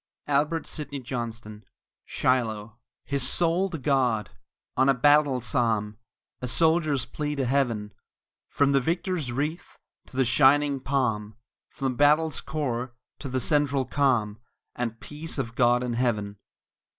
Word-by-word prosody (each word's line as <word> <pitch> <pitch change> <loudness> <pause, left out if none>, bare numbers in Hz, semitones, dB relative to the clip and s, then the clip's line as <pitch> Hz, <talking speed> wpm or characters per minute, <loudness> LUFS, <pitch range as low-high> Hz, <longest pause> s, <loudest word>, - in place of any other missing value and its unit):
ALBERT 150 +3 +1
SIDNEY 145 -2 -6
JOHNSTON 115 -4 -6 0.4
SHILOH 110 -4 -1 0.3
His 140 -1 -2
soul 170 +8 +2
to 170 - -5
God! 130 -6 +1 0.4
on 130 +1 +3
a 135 - +4
battle 145 0 +4
psalm! 110 -4 0 0.4
A 125 - -3
soldier's 155 +1 +2
plea 150 0 -4
to 135 -2 -1
Heaven! 120 -6 0 0.6
From 140 -1 +2
the 140 - +4
victor 175 +7 -1
wreath 150 +1 -3 0.3
to 130 - -12
the 130 - +3
shining 140 +3 +4
Palm; 115 -6 -1 0.3
From 135 -1 -2
the 125 - -8
battle's 150 +2 +3
core 125 -5 -3 0.2
to 140 - -6
the 130 0 -1
central 140 -1 +1
calm, 125 -6 +1 0.4
And 115 -2 -3
peace 155 +2 -7
of 115 -5 -3
God 120 +1 +3
in 125 -1 -2
Heaven. 110 -4 -1
130 Hz, 140 wpm, -26 LUFS, 120-145 Hz, 0.6 s, a